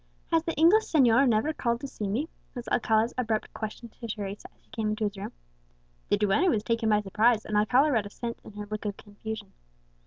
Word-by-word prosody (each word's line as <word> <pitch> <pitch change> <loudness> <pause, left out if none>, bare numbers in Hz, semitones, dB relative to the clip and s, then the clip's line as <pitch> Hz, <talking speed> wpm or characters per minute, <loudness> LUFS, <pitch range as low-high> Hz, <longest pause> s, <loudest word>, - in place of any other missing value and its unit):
"Has 330 -1 +4
the 330 0 -3
English 350 +8 +5
señor 265 -3 +4
never 230 +8 +2
called 235 -4 -1
to 280 - -4
see 210 -6 -5
me?" 240 +11 -1 0.3
was 245 -1 -6
Alcala's 225 0 +2
abrupt 220 -3 -1
question 220 +2 -6
to 230 +1 -9
Teresa 205 -2 -5
as - - -35
she - - -33
came 220 -2 -2
into 215 +1 -2
his 205 -1 -1
room. 195 - -6 0.8
The 205 - +3
duenna 210 - +3
was 215 -7 +1
taken 230 -1 0
by 210 -1 +4
surprise, 215 +3 +2
and 215 - -3
Alcala 250 +8 +4
read 220 -5 +1
assent 235 +3 -6
in - - -12
her 210 0 -6
look 215 0 -4
of 205 -1 -3
confusion. 210 0 -8
220 Hz, 215 wpm, -28 LUFS, 210-245 Hz, 0.8 s, English